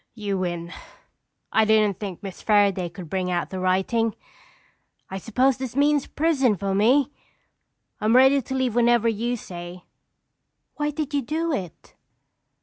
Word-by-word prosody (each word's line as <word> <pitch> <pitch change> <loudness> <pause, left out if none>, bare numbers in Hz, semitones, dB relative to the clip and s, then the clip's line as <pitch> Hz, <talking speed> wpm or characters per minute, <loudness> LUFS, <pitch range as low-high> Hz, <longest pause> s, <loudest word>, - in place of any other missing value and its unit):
"You 200 -3 -3
win. 175 -1 -4 0.8
I 220 - +4
didn't 215 -3 +3
think 200 -2 -6
Miss 195 -2 -8
Fairaday 200 -4 +2
could 180 -1 -9
bring 185 +2 -2
out 175 -1 -2
the 190 - -4
writing. 190 +5 +1 1.0
I 190 - -4
suppose 250 +6 +1
this 260 -2 -6
means 290 0 +2
prison 275 -9 +1
for 195 0 -2
me. 250 +8 +3 0.9
I'm 215 +3 +2
ready 265 +2 +6
to 265 +2 -5
leave 260 -3 0
whenever 235 -1 +3
you 235 +2 -1
say." 175 -2 -9 0.9
"Why 295 0 -2
did 300 -1 -4
you 285 - +1
do 320 +6 -2
it?" 180 - -6
220 Hz, 145 wpm, -24 LUFS, 190-265 Hz, 1.0 s, ready